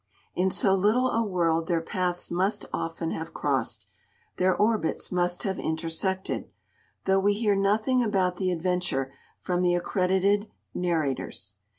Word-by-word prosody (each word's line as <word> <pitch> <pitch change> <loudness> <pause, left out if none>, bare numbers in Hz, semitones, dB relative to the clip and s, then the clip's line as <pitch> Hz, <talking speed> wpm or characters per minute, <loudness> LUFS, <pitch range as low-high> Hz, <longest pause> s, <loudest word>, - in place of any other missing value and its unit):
In 185 +1 +1
so 190 +1 +3
little 215 +7 +3
a 230 - +1
world 165 -5 +1
their 170 -2 +2
paths 180 +1 -2
must 190 +4 0
often 165 0 -3
have 160 - -5
crossed, - - 0 0.5
their 185 0 +3
orbits 215 -5 0
must 180 0 +1
have 190 -2 -2
intersected, 165 +4 -2 0.6
though 195 0 +4
we 205 +1 +2
hear 210 -1 +2
nothing 215 +6 +2
about 190 -5 +1
the 185 -1 0
adventure 175 -6 -1 0.3
from 180 0 0
the 175 -1 +3
accredited 190 +3 +1 0.2
narrators. 160 -7 -2
185 Hz, 140 wpm, -27 LUFS, 175-200 Hz, 0.6 s, though